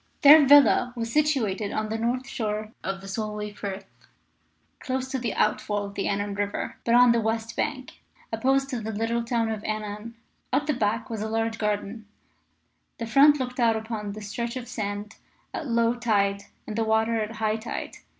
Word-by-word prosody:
Their 290 0 +9
villa 280 -3 +6
was 230 -1 -4
situated 230 -10 +1
on 215 0 -2
the 220 - -2
north 250 +3 -1
shore 215 -4 -3
of 195 0 -3
the 195 - -10
Solway 210 +1 -4
Firth, 200 -1 -6 0.9
close 260 -1 -3
to 265 - -2
the 235 -4 -3
outfall 210 -1 0
of 200 - -8
the 200 - -2
Annan 205 0 -1
River, 205 0 -3
but 235 - +3
on 245 0 +7
the 235 -1 +2
west 225 +1 -2
bank, 265 -4 -4 0.3
opposite 270 +4 +1
to 250 - -2
the 220 +1 -4
little 230 +2 -1
town 230 -1 0
of 215 -1 -4
Annan. 215 +1 -5 0.4
At 275 +3 +1
the 300 - +1
back 225 -1 -1
was 220 -2 -3
a 220 - -3
large 225 0 -1
garden, 210 +1 -2 0.9
the 230 - -4
front 280 +6 +6
looked 250 0 -4
out 230 -2 +4
upon 220 -2 -4
the 215 - -8
stretch 235 +4 -4
of 245 -1 -7
sand 210 -2 -5 0.4
at 305 - -4
low 230 -1 +2
tide 200 -4 0 0.2
and 215 - -6
the 225 - +1
water 220 +1 +1
at 215 +1 -4
high 220 -1 0
tide. 225 +1 -6
225 Hz, 190 wpm, -26 LUFS, 210-245 Hz, 0.9 s, Their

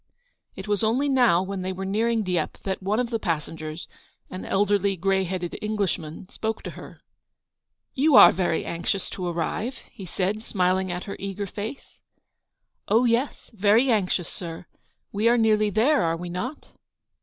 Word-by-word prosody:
It - - -8
was 205 +1 0
only 245 +6 +2
now, 245 -10 +4
when 195 0 -4
they 185 +1 -2
were 190 +1 -5
nearing 220 +3 +1
Dieppe, 180 -4 -2
that 190 -1 -3
one 205 +4 0
of 250 -1 -1
the 225 - 0
passengers, 160 -3 -4 0.4
an 185 - -6
elderly, 200 0 +2
grey 190 +2 +1
headed 180 -1 -4
Englishman, 190 -6 -3
spoke 220 0 -4
to - - -5
her. - - -12 0.9
"You 285 +1 +3
are 205 - +10
very 175 -3 -1
anxious 170 +3 -2
to 180 -2 -4
arrive," 175 +9 -2 0.2
he 195 -5 -10
said, 200 +5 -2
smiling 185 -2 0
at 175 0 -4
her 200 - -6
eager 200 +1 -4
face. 210 +7 -7 0.9
"Oh, 225 +4 +4
yes, 240 +4 0
very 220 +5 +4
anxious, 185 -5 +1
sir. 170 -1 -7 0.5
We 215 +3 +2
are 240 - +4
nearly 215 -2 +3
there, 225 +6 +3
are 165 -1 0
we 175 +1 -6
not 235 - -5
200 Hz, 165 wpm, -25 LUFS, 180-220 Hz, 0.9 s, are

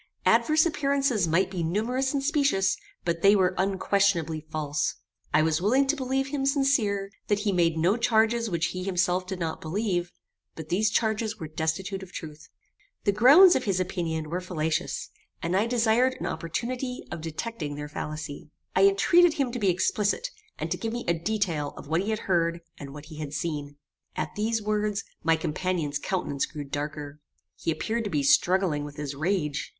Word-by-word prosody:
Adverse 310 +1 +4
appearances 275 - +1
might 185 +4 +2
be 180 -3 -3
numerous 230 +10 0
and 280 -2 -1
specious, 280 -9 +2 0.3
but 170 -1 -1
they 200 +2 +6
were 185 -2 +3
unquestionably 190 -4 +1
false. 150 -1 -1 0.4
I 155 +1 +4
was 160 +1 +1
willing 255 +8 +3
to 275 +3 +1
believe 270 0 -1
him 280 -1 -2
sincere, 235 -9 +1 0.2
that 205 -1 +1
he 210 -1 +1
made 170 -3 +2
no 180 +7 +2
charges 230 0 +2
which 170 -2 0
he 185 - -4
himself 185 -1 0
did 190 -1 -4
not 165 -2 -3
believe; 175 0 -1 0.4
but 160 -1 -8
these 205 +4 +2
charges 220 0 0
were 160 - -6
destitute 165 +5 -2
of 190 -1 -10
truth. 155 -2 -9 0.5
The 205 - +3
grounds 280 - +8
of 255 - 0
his 195 -3 +1
opinion 165 -4 -2
were 180 +2 -1
fallacious; 160 -3 -2 0.3
and 170 +2 -1
I 205 +4 +2
desired 240 +2 +2
an - - -4
opportunity 250 +9 -3
of 165 - -5
detecting 160 -1 -4
their 150 0 -5
fallacy. 150 0 -6 0.3
I 195 +1 +6
entreated 330 - +4
him 275 -5 0
to 245 - -4
be 200 -3 +2
explicit, 210 - 0 0.3
and - - -4
to - - 0
give 225 0 -3
me 240 - -4
a 170 - +3
detail 170 -4 -2
of - - -9
what 160 +3 +1
he 200 - -3
had 215 -1 -1
heard, 170 -2 +1 0.2
and 140 -1 -8
what 145 +1 -10
he 155 -1 -11
had 150 -2 -5
seen. 145 -1 -3 0.4
At - - -3
these 220 +1 -1
words, 210 -1 0 0.2
my 165 +1 +3
companion's 160 -2 -2
countenance 145 -6 -2
grew 150 -2 -6
darker. 145 +1 -5 0.4
He - - -4
appeared 220 +9 -1
to - - -2
be 150 -6 0
struggling 175 0 +3
with 145 -1 -8
his 145 -1 -4
rage. 150 -1 -1
185 Hz, 185 wpm, -27 LUFS, 160-225 Hz, 0.5 s, grounds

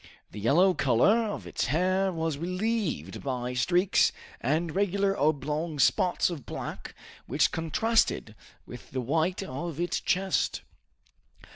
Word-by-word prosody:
The 105 - -8
yellow 170 - +4
color 175 - +3
of 205 - -5
its - - -2
hair 185 +7 +1
was 160 -4 -2
relieved 180 - -2
by 125 -2 -3
streaks 175 +9 +3 0.3
and 155 +6 0
regular 200 0 +1
oblong 150 +1 -1
spots 180 +5 +2
of 155 -7 -6
black, - - -7 0.3
which 140 -1 +2
contrasted 165 - +1 0.3
with 120 -4 -11
the 130 - -3
white 160 +9 0
of 165 0 -5
its 175 0 0
chest. 190 +1 0
165 Hz, 125 wpm, -28 LUFS, 140-185 Hz, 0.3 s, yellow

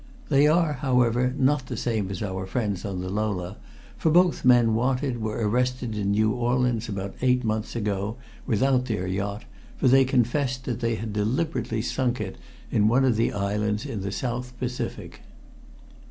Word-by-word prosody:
They 145 0 +5
are, 160 0 +3
however, 125 -1 +2
not 135 -1 +2
the - - -5
same 110 -5 -1
as 95 +1 -4
our 95 -1 -4
friends 105 -2 -2
on 95 -3 -3
the 95 - -4
Lola, 100 -3 -2 0.4
for 160 - +2
both 175 +2 +3
men 120 -3 +5
wanted 125 +1 0
were 110 0 -1
arrested 125 0 0
in 100 -1 -1
New 110 +2 +3
Orleans 120 -1 0
about 100 -1 -4
eight 125 0 +2
months 110 0 -2
ago, 105 0 -2 0.3
without 125 +3 +2
their 105 -6 -2
yacht, 100 +3 -3 0.3
for - - +2
they 135 +1 +6
confessed 130 +1 0
that 120 -3 -3
they 115 -2 0
had 110 -1 -5
deliberately 115 +1 -1
sunk 125 -1 -1
it 95 -3 -5 0.3
on 105 - +4
one 130 +4 +4
of 125 -3 +3
the 115 +2 +1
islands 105 +1 -1
in 105 - -4
the 100 0 -3
South 125 +3 -4
Pacific." 125 -1 -5
115 Hz, 170 wpm, -25 LUFS, 105-125 Hz, 0.4 s, they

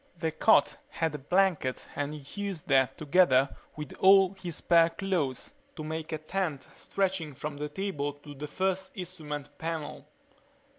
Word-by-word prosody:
The 160 -1 -1
cot 145 -2 +4
had 165 -2 -1
a 150 - -4
blanket 175 -3 +1
and 145 +1 -2
he 150 +7 -8
used 195 -6 -4
that 135 -1 +3
together 140 -4 +4 0.2
with 150 -2 -7
all 195 0 +7
his 180 -4 -6
spare 170 -1 +4
clothes 175 - -2 0.2
to 155 - -6
make 160 +1 -4
a 155 - -1
tent 155 -3 -3
stretching 185 -7 -2
from 150 +2 -5
the 150 +1 -3
table 145 -5 -2
to 145 +1 -12
the 145 +2 -6
first 190 +4 -1
instrument 155 -6 -6
panel. 160 -2 -4
155 Hz, 155 wpm, -29 LUFS, 145-185 Hz, 0.2 s, all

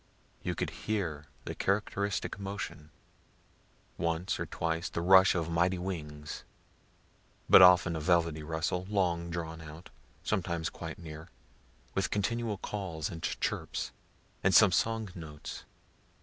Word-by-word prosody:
You - - -2
could - - -2
hear 85 -8 -3 0.2
the - - -4
characteristic 100 0 -1
motion 100 -6 -5 1.1
once 85 +2 -1
or - - -2
twice 85 +1 -2
"the - - -3
rush 95 +2 +7
of 85 -3 0
mighty 85 +2 +2
wings," 75 -5 -5 1.0
but - - +9
often 90 -1 +7
a - - -2
velvety 85 -1 +2
rustle, 80 +4 -2
long 85 -4 +1
drawn 80 -1 -4
out 80 +3 -11 0.3
sometimes 85 -5 -1
quite 80 -2 -7
near 80 -1 -9 0.6
with 95 - 0
continual 110 +1 -1
calls 95 -7 -4
and 80 - -7
chirps, - - -2 0.5
and 95 0 +4
some 110 -4 +8
song 110 +1 +1
notes. 80 -5 -8
85 Hz, 125 wpm, -31 LUFS, 80-95 Hz, 1.1 s, but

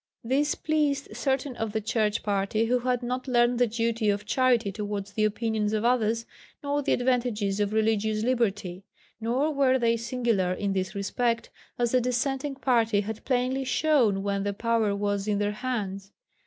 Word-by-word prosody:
This 275 +5 +1
pleased 295 -3 -1
certain 270 -1 -1
of 225 -2 -3
the 220 - +1
Church 215 -1 0
Party 205 +2 0
who 250 +2 +2
had 250 0 -1
not 250 +2 -3
learned 240 -1 +3
the 245 - +4
duty 230 -1 0
of 205 0 -1
charity 245 -4 +2
towards 205 -1 -5
the 215 - 0
opinions 215 0 -1
of 215 +1 0
others, 230 -2 +1 0.4
nor 285 0 0
the - - +1
advantages 240 -5 0
of 205 0 0
Religious 220 0 +1
Liberty. 205 -7 -1 0.4
Nor 250 +7 0
were 270 -2 +3
they 230 -2 +2
singular 230 -6 0
in 200 +1 -2
this 185 -1 -2
respect, 230 +4 -1 0.3
as 240 -1 +1
the 255 - +3
Dissenting 270 +3 -1
Party 230 -6 +2
had 220 +1 -6
plainly 260 +1 0
shown 255 -8 +2
when 200 -1 -1
the 200 0 -1
power 225 -1 +1
was 205 0 -1
in 210 -1 +1
their 205 0 0
hands. 205 -4 -4
230 Hz, 170 wpm, -27 LUFS, 205-250 Hz, 0.4 s, the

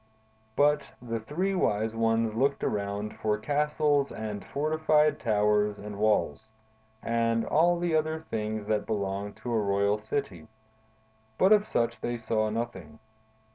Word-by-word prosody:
"But 145 -1 +2
the 115 -2 -4
three 175 - -2
wise 110 - 0
ones 115 -1 +1
looked 135 +5 0
around 100 +1 -2
for 105 -1 0
castles 145 +2 +1
and 105 -2 -5
fortified 155 +1 +1
towers 105 -2 +2
and 105 0 -8
walls, 110 +1 +1 0.5
and 115 0 +1
all 175 +3 +3
the 170 -2 0
other 155 0 0
things 110 -1 -2
that 105 0 -1
belong 100 -1 -2
to 120 - -5
a 110 - +2
royal 100 +1 +1
city; 125 +2 -4 0.9
but 190 - +4
of 210 0 +5
such 115 -1 -1
they 120 0 -2
saw 110 -1 0
nothing. 105 -9 -5
115 Hz, 135 wpm, -28 LUFS, 105-145 Hz, 0.9 s, of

